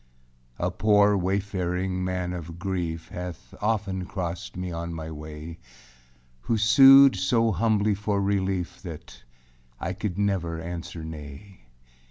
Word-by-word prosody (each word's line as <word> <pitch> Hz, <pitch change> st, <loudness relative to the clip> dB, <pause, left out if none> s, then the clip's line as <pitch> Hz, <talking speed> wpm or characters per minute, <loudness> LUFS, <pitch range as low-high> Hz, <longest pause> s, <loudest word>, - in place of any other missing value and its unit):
A 90 Hz, +1 st, -1 dB
poor 105 Hz, +1 st, +4 dB
wayfaring 95 Hz, -1 st, -1 dB
Man 90 Hz, -1 st, -2 dB
of 85 Hz, -1 st, -7 dB
grief 85 Hz, -3 st, -3 dB
Hath 90 Hz, -2 st, -7 dB
often 100 Hz, -4 st, -1 dB
crossed 90 Hz, -2 st, -5 dB
me 90 Hz, 0 st, -4 dB
on 85 Hz, 0 st, -4 dB
my 80 Hz, 0 st, -6 dB
way, 75 Hz, +2 st, -8 dB, 0.8 s
Who 115 Hz, -, -1 dB
sued 135 Hz, +4 st, +8 dB
so 115 Hz, +4 st, +2 dB
humbly 105 Hz, +1 st, +2 dB
for 100 Hz, 0 st, -1 dB
relief 95 Hz, -2 st, -1 dB
That 80 Hz, -8 st, -10 dB, 0.6 s
I 95 Hz, -, -3 dB
could 100 Hz, -2 st, -4 dB
never 95 Hz, -5 st, -1 dB
answer 85 Hz, 0 st, -6 dB
nay. 80 Hz, +1 st, -10 dB
90 Hz, 125 wpm, -26 LUFS, 85-100 Hz, 0.8 s, sued